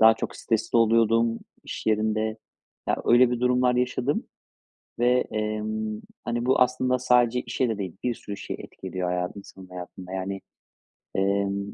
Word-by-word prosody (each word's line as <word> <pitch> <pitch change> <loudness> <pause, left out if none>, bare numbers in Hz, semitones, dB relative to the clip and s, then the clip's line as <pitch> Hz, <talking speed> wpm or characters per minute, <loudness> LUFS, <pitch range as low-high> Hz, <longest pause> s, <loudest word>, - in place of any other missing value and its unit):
daha 110 0 +8
çok - - -5
stresli 115 0 0
oluyordum 115 0 +4 0.3
iş - - -6
yerinde. 110 0 +1 0.5
Ya, - - +2
öyle 120 +1 +6
bir 125 -1 -1
durumlar 125 0 +3
yaşadım 125 +2 0 0.7
ve, 125 +1 +4
emm, 110 0 -2 0.2
hani, 120 +1 -1
bu 130 0 +3
aslında 130 0 +3
sadece 125 -1 +3
işe 130 - -1
de 110 -2 -2
değil, 95 -2 -4
bir 125 -1 0
sürü 100 -2 -7
şeye - - -6
etki - - -10
ediyor 95 -1 -2
hayatı 90 +2 -2
insanın 95 -1 -12
hayatında, 90 0 -9
yani. 95 +1 -3 0.8
Emm, 100 +1 0
110 Hz, 155 wpm, -26 LUFS, 100-125 Hz, 0.8 s, daha